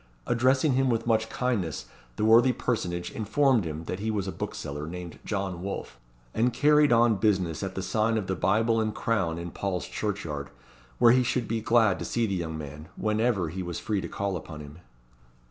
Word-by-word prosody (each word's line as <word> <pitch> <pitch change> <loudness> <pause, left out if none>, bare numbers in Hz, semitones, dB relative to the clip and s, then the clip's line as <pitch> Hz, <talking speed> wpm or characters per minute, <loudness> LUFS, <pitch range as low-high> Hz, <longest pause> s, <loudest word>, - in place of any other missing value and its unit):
Addressing 130 +4 +3
him 135 0 +2
with 115 -1 0
much 110 -1 +1
kindness, 100 - -2 0.3
the 105 - 0
worthy 120 +3 +6
personage 90 -10 -2
informed 120 0 +2
him 80 0 -5
that 90 +3 -4
he 110 +2 -2
was 100 -3 -1
a - - -2
bookseller, 75 -3 -5
named 90 0 -7
John 95 -4 -3
Wolfe, 90 -10 -6 0.3
and 120 +3 +2
carried 150 +3 +4
on 115 -2 +4
business 95 -6 +1
at 95 -1 -4
the 95 - -3
sign 110 +4 +1
of 105 - -2
the 95 - -1
Bible 110 +6 +2
and 110 -1 -2
Crown 95 -8 0
in 85 0 -6
Paul's 95 -2 -3
Churchyard, 85 -9 -4 0.5
where 120 -1 +6
he 130 +1 +5
should 125 -2 -1
be 115 0 -1
glad 110 -4 +3
to - - -4
see 120 -1 0
the 100 - -2
young 80 -3 -3
man, 75 +1 -8
whenever 110 -4 0
he 95 +4 -5
was 90 -1 -4
free 105 -3 -1
to 85 - -5
call 100 +2 -2
upon 75 -3 -7
him. 75 +2 -11
105 Hz, 195 wpm, -27 LUFS, 85-115 Hz, 0.5 s, worthy